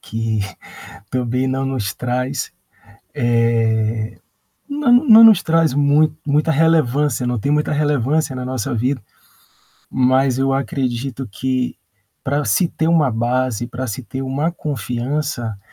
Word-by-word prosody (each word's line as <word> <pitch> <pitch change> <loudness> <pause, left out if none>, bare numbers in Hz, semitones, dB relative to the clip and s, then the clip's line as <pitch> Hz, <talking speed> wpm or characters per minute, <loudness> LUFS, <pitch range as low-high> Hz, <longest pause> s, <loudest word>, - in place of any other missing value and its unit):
que 110 -1 -3 0.7
também 125 0 -1
não 135 +1 -1
nos 120 -5 -3
traz, 125 +2 -3 0.6
eh, 115 -2 0 0.5
não 285 -3 +1
não 225 -1 +9
nos 215 -5 +7
traz 160 -4 +2
muito 145 +1 +3
muita 150 +3 +1
relevância, 150 -4 +2
não 125 -1 -1
tem 125 +7 -2
muita 150 0 0
relevância 145 -1 0
na 125 - -5
nossa 130 -3 -3
vida, 125 +3 -1 0.9
mas 130 0 +2
eu 135 0 +1
acredito 135 -1 -3
que 130 +4 -2 0.5
pra 145 +2 0
se 115 - +2
ter 160 0 -1
uma 160 -5 +3
base, 120 0 -1
pra 125 +2 -5
se 110 +2 -5
ter 130 +2 -6
uma 135 +5 -1
confiança, 125 - -3
130 Hz, 130 wpm, -19 LUFS, 120-150 Hz, 0.9 s, não